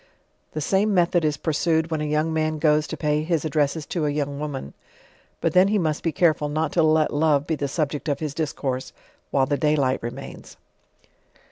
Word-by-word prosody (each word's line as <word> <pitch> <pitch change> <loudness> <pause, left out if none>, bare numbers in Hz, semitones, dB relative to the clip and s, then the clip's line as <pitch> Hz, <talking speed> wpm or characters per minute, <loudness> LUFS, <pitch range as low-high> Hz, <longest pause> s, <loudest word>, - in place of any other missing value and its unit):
r - - -1
J 150 - -2
he 190 0 +2
came 210 -1 +1
method 175 -1 +3
is 150 -1 +1
pureucd 160 +1 0
when 155 -1 -1
a - - -1
youi;g 150 +1 +1
man 155 -1 0
goes 150 0 +2
to - - -5
pay 150 -1 0
his 160 0 -1
ad 155 - -2
dresses 150 +1 0
to 155 -2 -2
a - - +1
young 145 -1 -2
woman; 140 - -5 0.7
Lut - - +1
then 185 +1 +6
he 210 +1 +2
must 155 -5 0
be 165 - 0
careful 155 -4 +2
not 155 +1 -1
to 170 - +2
let 155 -1 +3
love 145 -1 +2
be 165 - -1
the 145 -2 -2
subject 150 0 -2
of 145 - 0
his 150 -3 -3
discourse 140 -4 -3 0.4
while 135 -1 +2
the 145 +1 0
day 150 0 +2
light 130 -3 +1
remains. 125 +4 -8
155 Hz, 220 wpm, -24 LUFS, 145-160 Hz, 0.7 s, then